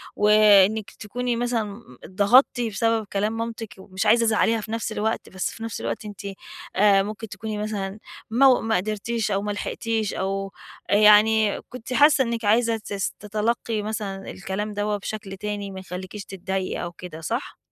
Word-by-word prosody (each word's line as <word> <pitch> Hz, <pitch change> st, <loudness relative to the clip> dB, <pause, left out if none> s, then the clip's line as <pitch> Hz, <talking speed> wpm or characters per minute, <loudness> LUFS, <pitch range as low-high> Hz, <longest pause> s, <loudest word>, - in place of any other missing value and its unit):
وإنِك 210 Hz, 0 st, +5 dB
تكوني 245 Hz, +3 st, -3 dB
مثلًا 230 Hz, -3 st, -2 dB, 0.2 s
اتضغطتِ 205 Hz, +7 st, +4 dB
بسبب 225 Hz, 0 st, 0 dB
كلام 210 Hz, +3 st, 0 dB
مامتِك 230 Hz, -1 st, -5 dB
ومش 190 Hz, +1 st, -4 dB
عايزة 230 Hz, +2 st, +5 dB
تزعليها 225 Hz, 0 st, +2 dB
في 215 Hz, -, -8 dB
نفس 225 Hz, 0 st, -2 dB
الوقت، 220 Hz, +1 st, -2 dB
بس 190 Hz, 0 st, -3 dB
في 225 Hz, -, -9 dB
نفس 225 Hz, -, -5 dB
الوقت 115 Hz, -, -4 dB
أنتِ 205 Hz, -3 st, -8 dB, 0.5 s
آآ، 195 Hz, 0 st, +5 dB
ممكن 215 Hz, +2 st, -6 dB
تكوني 215 Hz, +2 st, -5 dB
مثلًا 210 Hz, -1 st, -4 dB, 0.3 s
مو 255 Hz, +2 st, +5 dB
ما 225 Hz, 0 st, 0 dB
قدرتيش 215 Hz, +3 st, -2 dB
أو 195 Hz, 0 st, +1 dB
ما 205 Hz, 0 st, -2 dB
لحقتيش 220 Hz, +1 st, -2 dB
أو 195 Hz, +1 st, -2 dB, 0.4 s
يعني 210 Hz, +1 st, +5 dB
كنتِ 250 Hz, 0 st, -7 dB
حاسة 290 Hz, 0 st, +6 dB
إنِك 235 Hz, -2 st, -3 dB
عايزة 225 Hz, +2 st, +3 dB
تس 200 Hz, -3 st, -3 dB
تتلقي 215 Hz, +1 st, -1 dB
مثلًا 205 Hz, -2 st, -4 dB
الكلام 205 Hz, +2 st, -4 dB
دوّة 205 Hz, 0 st, -1 dB
بشكل 200 Hz, -1 st, -6 dB
تاني 205 Hz, 0 st, -4 dB
ما 190 Hz, -, -7 dB
يخليكيش 185 Hz, +2 st, -7 dB
تتضايقي 190 Hz, 0 st, -3 dB
أو 175 Hz, -, -4 dB
كده، 170 Hz, -2 st, -10 dB
صح؟ 230 Hz, -, -4 dB
210 Hz, 160 wpm, -24 LUFS, 195-225 Hz, 0.5 s, حاسة